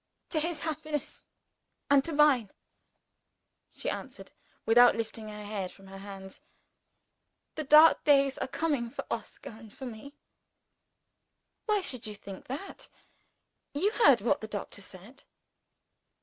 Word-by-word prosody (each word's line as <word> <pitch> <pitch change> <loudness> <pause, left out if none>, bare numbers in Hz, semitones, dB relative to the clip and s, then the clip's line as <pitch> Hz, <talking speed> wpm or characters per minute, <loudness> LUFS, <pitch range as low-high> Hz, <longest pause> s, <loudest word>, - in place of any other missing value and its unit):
"To 315 - +1
his 325 0 -2
happiness 310 -2 -4 0.6
and 280 -1 +5
to 330 - -2
mine," 290 -8 +4 1.2
she - - -8
answered, - - -6 0.3
without 240 +2 +6
lifting 225 -1 -5
her 210 0 -8
head 200 -3 -4
from 195 - -17
her 195 0 -11
hands. 195 -1 -10 1.1
"The 310 - -5
dark 305 +3 +7
days 275 -2 +3
are - - -2
coming 280 -5 -1
for - - -7
Oscar - - -6
and 220 -1 -14
for 265 - -9
me." 245 +4 -9 1.5
"Why 420 -2 +2
should 250 -10 -3
you 210 - -7
think 195 -2 -11
that? 290 +10 -8 0.9
You 390 +9 +1
heard 285 - +5
what 285 +7 +1
the 220 - -5
doctor 205 -1 -6
said." 195 +8 -13
250 Hz, 135 wpm, -29 LUFS, 210-300 Hz, 1.5 s, dark